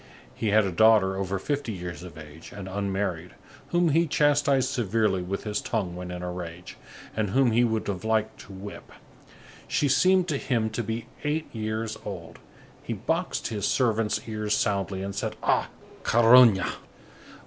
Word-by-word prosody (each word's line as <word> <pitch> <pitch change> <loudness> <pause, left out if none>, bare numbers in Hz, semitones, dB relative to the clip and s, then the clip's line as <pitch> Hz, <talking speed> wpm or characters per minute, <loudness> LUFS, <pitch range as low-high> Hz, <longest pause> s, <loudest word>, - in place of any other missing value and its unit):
He 110 - -3
had 105 0 +4
a 95 - -1
daughter 105 0 +4
over 95 0 -2
fifty 140 +4 -2
years 90 -3 -6
of 90 -3 -10
age, 80 +1 -11
and 100 -1 -8
unmarried, 95 -3 -3 0.3
whom 175 -1 +2
he 165 +3 +3
chastised 140 -3 +2
severely 110 -6 +1
with 95 +2 -4
his 105 -1 -2
tongue, 95 -7 -2
when 90 0 -6
in 90 0 -6
a 90 - -3
rage, 90 0 -8 0.4
and 110 -2 0
whom 130 +3 +3
he 120 +2 +4
would 110 -2 0
have 95 -2 -3
liked 110 0 0
to - - -12
whip. 95 +2 -9 0.8
She 145 - +1
seemed 185 +6 +4
to 145 - 0
him 115 -5 -1
to 115 - -2
be 115 +1 -4 0.2
eight 155 +2 -1
years 110 0 -3
old. 90 -5 -8 0.4
He - - -4
boxed - - -2
his 105 -3 -2
servants' 115 -4 +1
ears 105 -1 -1
soundly, 100 -3 -1
and 100 0 -4
said: 100 - -3
"Ah! - - +2 0.3
carogne!" 115 -4 +6
105 Hz, 170 wpm, -26 LUFS, 95-120 Hz, 0.8 s, carogne